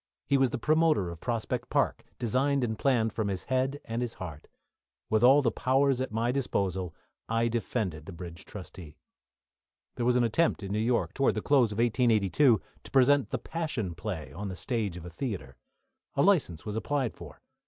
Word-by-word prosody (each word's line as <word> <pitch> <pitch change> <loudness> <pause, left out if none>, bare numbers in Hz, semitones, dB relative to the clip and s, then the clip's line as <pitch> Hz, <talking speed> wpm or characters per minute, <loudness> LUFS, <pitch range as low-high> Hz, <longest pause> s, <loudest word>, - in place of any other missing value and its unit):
He 140 - +2
was 135 -2 +4
the - - -3
promoter 155 - +2
of 85 - -9
Prospect 115 -3 -2
Park, - - +1
designed 130 +3 +1
and 110 -2 -2
planned 115 -5 +2
from 110 -2 -1
his 95 -2 -3
head 130 +2 0
and 115 +1 -3
heart. 80 -6 -8 0.6
With 110 -1 +3
all 135 +3 +7
the 115 - +2
powers 135 0 +2
at 130 - -3
my 115 +2 0
disposal 95 - -1 0.3
I 115 +1 +2
defended 105 -8 -2
the - - -6
bridge 85 0 -9
trustee. 90 -6 -10 1.0
There 120 - -1
was 125 - +4
an 125 - +4
attempt 120 +2 +1
in 95 - -5
New 105 - 0
York, 120 +2 +1
towards 135 - +2
the - - -1
close 130 -6 +4
of 105 - -5
1882, 115 0 +3 0.2
to - - -13
present 135 +1 +4
the - - -1
Passion 150 - -3
Play 90 -2 -5
on 100 +4 -5
the 95 - -5
stage 105 -4 -2
of 85 - -9
a - - -6
theatre. 85 - -5 0.6
A 140 - +3
licence 145 - +2
was 105 - -4
applied 135 +1 -1
for. - - -11
115 Hz, 185 wpm, -29 LUFS, 95-130 Hz, 1.0 s, all